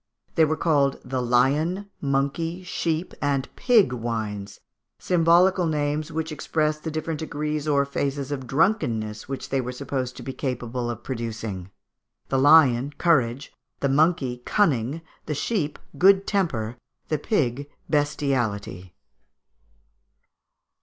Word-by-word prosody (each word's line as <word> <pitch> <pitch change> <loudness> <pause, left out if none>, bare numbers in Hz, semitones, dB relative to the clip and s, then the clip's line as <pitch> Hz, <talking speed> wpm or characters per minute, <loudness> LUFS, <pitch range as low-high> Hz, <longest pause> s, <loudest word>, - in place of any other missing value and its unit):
They 160 - +5
were 155 +1 -1
called 145 -4 +2
the 130 0 -2
lion, 150 +11 +1
monkey, 140 +6 -1
sheep, 170 -1 -2
and 140 -2 -1
pig 220 - +4
wines, 110 -4 -4 0.4
symbolical 175 +1 +3
names, 150 0 -1
which 160 0 -3
expressed 155 0 -1
the 160 - -2
different 155 0 -3
degrees 150 -1 -3
or 140 -2 +3
phases 140 0 -2
of 130 -3 -4
drunkenness 120 - 0
which 135 - -5
they 135 -1 +1
were 125 0 -4
supposed 130 -1 -4
to - - -8
be 135 - -5
capable 125 -2 -3
of 120 0 -5
producing: 110 -6 -5 0.6
the 135 - +1
lion, 140 -2 +5
courage; 140 -5 +1 0.3
the 140 - +1
monkey, 140 -4 +2
cunning; 150 - +1 0.2
the 150 - -1
sheep, 160 -1 -1 0.2
good 195 +1 +5
temper; 125 - -1 0.3
the 155 - 0
pig, 140 - -1 0.2
bestiality. 120 - -1
140 Hz, 125 wpm, -25 LUFS, 125-160 Hz, 0.6 s, They